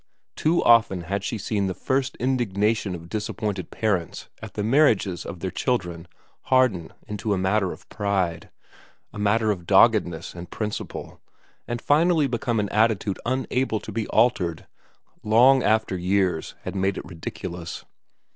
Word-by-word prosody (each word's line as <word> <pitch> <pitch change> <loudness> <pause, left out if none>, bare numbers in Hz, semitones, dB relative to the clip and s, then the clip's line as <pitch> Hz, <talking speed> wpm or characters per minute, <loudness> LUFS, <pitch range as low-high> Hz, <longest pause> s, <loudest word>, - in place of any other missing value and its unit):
Too 165 +3 +2
often 110 -6 +5
had 100 +4 -3
she 115 - -2
seen 105 -1 -1
the 95 - -3
first 135 0 -1
indignation 110 -5 0
of 85 0 -10
dis 105 +2 -3
appointed 100 -5 -3
parents 95 -7 -2
at 110 -1 -9
the 105 - -2
marriages 110 - +2
of 90 -4 -7
their 95 - -2
children 90 -7 -2 0.4
harden 125 -11 +2 0.2
into 105 0 -2
a - - -2
matter 95 0 +1
of - - -11
pride, 95 -5 -2 0.6
a 105 - -7
matter 105 +1 +2
of 90 -5 -5
doggedness 95 -5 +3
and 85 0 -9
principle, 105 -1 -5 0.5
and 120 0 -3
finally 160 +3 +3
become 120 -2 -1
an 105 -1 -1
attitude 105 -3 +1
unable 130 -2 0
to 110 - -9
be 110 +1 -2
altered, 90 -9 +1 0.6
long 125 +5 +5
after 110 -4 +1
years 90 -2 0
had - - -5
made 95 0 0
it - - -6
ridiculous. 85 0 -7
105 Hz, 150 wpm, -24 LUFS, 95-115 Hz, 0.6 s, often